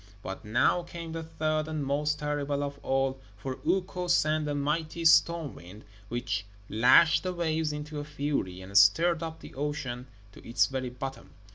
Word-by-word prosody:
But 95 - -6
now 115 +10 +2
came 170 -1 -8
the 165 0 -4
third 155 -1 -1
and 155 -2 -3
most 150 +2 0
terrible 145 -1 -1
of 140 0 -5
all, 135 0 0 0.2
for 130 +5 -5
Ukko 180 -1 0
sent 155 -3 +2
a 145 - -1
mighty 155 +3 -2
storm 165 -2 +4
wind, 90 +5 -13 0.2
which 120 -3 -2 0.3
lashed 125 +9 +6
the 185 -1 -3
waves 160 -3 0
into 150 0 -5
a - - -4
fury, 145 -11 -3
and 95 +2 -11
stirred 160 - +5
up 160 -1 -6
the - - -11
ocean 135 -3 -4 0.2
to - - -15
its 115 +2 +2
very 130 -2 -3
bottom. 125 - -7
150 Hz, 170 wpm, -29 LUFS, 130-160 Hz, 0.3 s, lashed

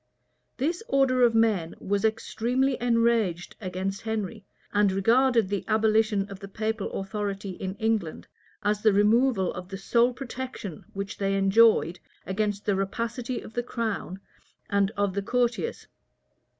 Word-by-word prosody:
This 330 - -1
order 270 -2 +3
of 235 -2 +5
men 210 -8 +2
was 200 0 -1
extremely 240 +4 0
enraged 230 -7 +1
against 190 +1 -3
Henry, 220 -1 -3 0.3
and 205 -1 +4
regarded 230 +3 +3
the 200 0 -2
abolition 215 -2 +2
of 200 -1 -9
the 195 - -8
papal 215 +1 -3
authority 195 0 -3
in 190 +1 -5
England 220 -7 -1 0.4
as 210 0 +1
the 215 -1 +4
removal 210 0 +3
of 180 0 -8
the 195 - -5
sole 235 +5 +3
protection 250 - -7
which 200 +1 -5
they 195 0 +1
enjoyed 195 -3 +4 0.3
against 205 +1 -2
the 205 - +2
rapacity 230 +5 -3
of - - -11
the 240 - 0
crown 220 -6 -3 0.5
and 200 -1 +3
of 200 -2 +1
the 200 - -1
courtiers. 245 - -1
210 Hz, 140 wpm, -27 LUFS, 195-235 Hz, 0.5 s, of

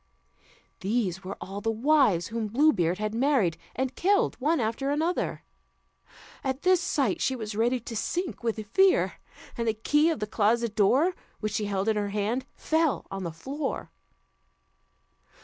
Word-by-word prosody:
These 195 -3 -1
were 190 +2 -6
all 195 +2 -6
the 225 - -1
wives 225 - +3
whom 225 -1 -2
Blue 290 +9 +4
Beard 175 +1 +1
had 215 +1 -2
married, 240 - +2 0.2
and 265 0 -1
killed 400 +2 +2
one 310 +5 +2
after 230 +4 -1
another. 320 +5 -1 1.0
At 265 0 -2
this 365 -1 +4
sight 270 - 0
she 265 - +1
was 220 -3 -5
ready 240 +4 +1
to 230 0 -7
sink 350 - -2
with 225 -2 -2
fear, 380 - +3 0.4
and 235 -2 -2
the 220 - +1
key 295 +8 +3
of 320 - -1
the 210 - -1
closet 220 +1 +1
door, 265 - +3 0.3
which 215 -1 -3
she 210 - -1
held 200 0 -1
in 220 -1 +2
her 205 -1 -1
hand, 215 +6 -1
fell 320 -2 +1
on 195 0 -4
the 170 - -3
floor. 270 - -4
230 Hz, 165 wpm, -27 LUFS, 210-285 Hz, 1.0 s, Blue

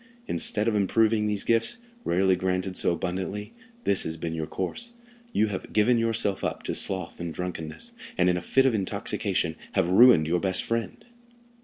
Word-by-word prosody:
Instead 105 - 0
of 115 - +2
improving 105 +1 +2
these 105 -2 -1
gifts, 115 - +2 0.3
rarely 95 +2 +2
granted 90 +1 -2
so - - +2
abundantly, 95 +4 -4 0.3
this 100 - +2
has 80 0 -3
been 80 0 -4
your 80 -1 -3
course—you 235 - -3
have 95 - -6
given 115 +3 +3
yourself 115 -3 +1
up - - -3
to - - -2
sloth 95 -3 -1
and 85 -1 -5
drunkenness, 80 -3 -5 0.3
and 90 - +3
in 90 - +3
a 90 - -2
fit 135 +8 +2
of 130 - +3
intoxication 100 -4 -1 0.2
have 90 -3 +1
ruined 115 -5 +7
your 85 +3 +1
best 95 -1 0
friend." 115 0 -3
95 Hz, 170 wpm, -26 LUFS, 90-115 Hz, 0.3 s, ruined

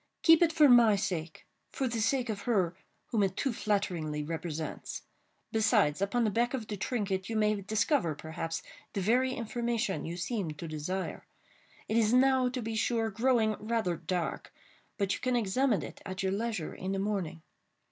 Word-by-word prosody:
"Keep 325 0 +7
it 335 -2 +5
for 310 -2 +6
my 240 -4 +7
sake—for 190 - -4
the 230 -2 -2
sake 250 +2 +1
of 205 -2 -3
her 185 -7 +2 0.4
whom 220 - +2
it 195 -1 0
too 270 -3 0
flatteringly 170 -9 -1
represents. 160 0 -5 0.5
Besides, 195 -8 +3
upon 200 +5 +1
the 215 - +2
back 240 +5 +1
of 235 -4 -4
the 210 - -4
trinket 195 -3 -2
you 225 - -2
may 210 -1 +2
discover, 210 - +1
perhaps, 160 +2 -5 0.3
the - - -1
very 250 +6 +2
information 235 -3 -2
you 170 +2 -5
seem 195 -1 -2
to 160 +3 -7
desire. 160 +5 -4 0.6
It 220 - +1
is 225 0 +3
now, 260 0 +4
to 250 -1 -4
be 225 +1 -3
sure, 225 0 +1
growing 225 0 +2
rather 215 -5 -1
dark—but 185 +3 -4
you - - -3
can 255 -1 0
examine 235 +1 +1
it - - -9
at 185 0 -5
your 190 - +1
leisure 210 -4 -2
in 190 +1 -4
the - - -1
morning. 190 -5 -2
210 Hz, 170 wpm, -30 LUFS, 185-235 Hz, 0.6 s, Keep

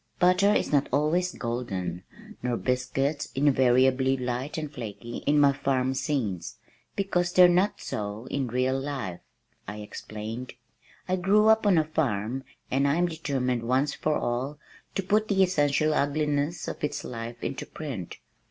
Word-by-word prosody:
"Butter 180 +3 +4
is - - 0
not 145 -2 +2
always 155 +6 +2
golden 95 -8 -3 0.4
nor 125 -1 -1
biscuits 135 +4 -1
invariably 130 -1 +3
light 125 +4 -3
and 150 -2 -4
flaky 120 -1 -6
in 145 +1 +4
my 140 -1 +5
farm 130 -2 0
scenes, 120 - -2 0.4
because 180 -3 0
they're 180 0 +8
not 180 +4 +2
so 105 +2 -5
in 140 -2 -1
real 130 +2 0
life," 135 -11 -4 0.5
I 105 +2 -5
explained. 110 +3 -7 0.5
"I 185 0 +1
grew 205 +4 +4
up 220 -1 +4
on 190 -4 +5
a 160 - +4
farm 130 -6 -1 0.3
and 135 +2 +2
I 140 - +2
am 175 +1 +2
determined 135 -7 -1
once 130 +5 +1
for 155 -1 0
all 130 +5 -2 0.4
to 195 - 0
put 210 +3 +2
the 195 -2 +4
essential 155 -3 +2
ugliness 150 +2 0
of - - -6
its 145 0 -2
life 115 0 -7
into 135 - -4
print. 130 - -6
140 Hz, 150 wpm, -27 LUFS, 125-155 Hz, 0.5 s, they're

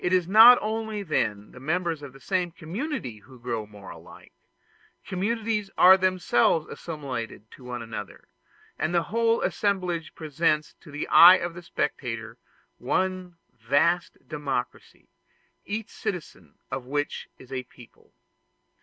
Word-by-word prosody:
It 180 - +1
is 180 -2 +2
not 225 +5 +9
only 220 -1 -3
then 105 - -1
the - - -13
members 165 +2 -1
of 145 -2 -9
the 135 - -16
same 180 +2 -1
community 170 - -5
who 125 +4 -17
grow 115 -3 -4
more 105 -2 -12
alike; - - -14 0.7
communities 210 +2 -2
are 185 +1 +9
themselves 185 -5 +2
assimilated 130 - -7
to 135 - -15
one 125 -1 -5
another, 110 -3 -8 0.5
and 155 +3 -1
the 170 - +3
whole 230 0 +2
assemblage 180 -5 -1
presents 155 0 0
to - - -15
the 145 +1 -5
eye 180 +2 +10
of 175 0 -4
the 175 - -9
spectator 115 -8 -4 0.4
one 185 +5 -2 0.2
vast 145 +10 +1
democracy, 140 -5 -5 0.6
each 215 +1 -4
citizen 180 -5 -6 0.2
of 130 -2 -5
which 145 +2 -3
is 130 0 -16
a 130 - -2
people. 120 -1 -19
165 Hz, 135 wpm, -26 LUFS, 125-185 Hz, 0.7 s, eye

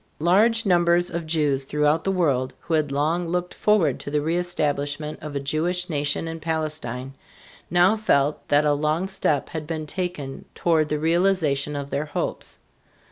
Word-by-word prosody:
Large 215 +8 +3
numbers 175 -1 +3
of 170 -1 -4
Jews 150 -4 +1
throughout 150 +3 +1
the 195 - +2
world, 135 -8 0
who 170 - -4
had 155 -3 +1
long 160 +5 0
looked 180 +1 -2
forward 195 -10 +2
to - - -6
the 150 - 0
reëstablishment 150 -2 -1
of 150 -2 -7
a - - 0
Jewish 170 +6 -1
nation 145 +2 -1
in 165 0 -5
Palestine, 155 -6 -3 0.6
now 175 +5 +4
felt 150 -10 +1
that 145 +1 +3
a 145 - +4
long 155 +5 0
step 150 -7 0
had 160 -3 -5
been 160 -1 -3
taken 150 -5 -4
toward 160 -3 +2
the 150 - 0
realization 160 -3 +1
of 140 0 -5
their 145 - -1
hopes. 145 - -3
155 Hz, 165 wpm, -24 LUFS, 145-175 Hz, 0.6 s, now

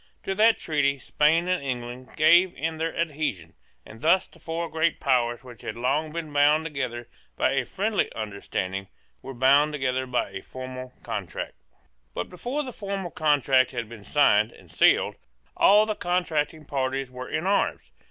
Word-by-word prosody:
To 195 - -2
that 220 +3 +4
treaty 145 -3 0
Spain 155 +6 +2
and 180 -2 +1
England 125 -1 -5
gave 175 +4 +5
in 160 +3 -2
their 165 +1 -3
adhesion; 150 - -2 0.3
and 110 +1 -13
thus 180 +4 +4
the 170 - -19
four 165 +1 -3
great 160 0 0
powers 120 -3 +1
which 120 -5 -12
had - - -5
long 140 +6 0
been 160 -2 -5
bound 150 +2 +4
together 125 -6 -4 0.3
by - - +2
a 135 -2 0
friendly 205 - -1
understanding 100 -2 -4 0.3
were 135 0 -8
bound 140 +4 +4
together 130 -2 -1
by 125 -5 -1
a 95 0 -6
formal 130 0 -8
contract, 60 - -5 0.5
But 90 - -3
before 245 - -3
that 260 - -6
formal 195 -4 -4
contract 140 -5 +3
had 120 -3 -3
been 110 -2 -11
signed 110 -5 +3
and - - -17
sealed, - - +3 0.4
all 210 +2 +6
the 215 - -1
contracting 165 -5 -1
parties 135 -1 -2
were 125 0 -7
in 160 - -2
arms. 200 +1 0
145 Hz, 165 wpm, -26 LUFS, 125-165 Hz, 0.5 s, all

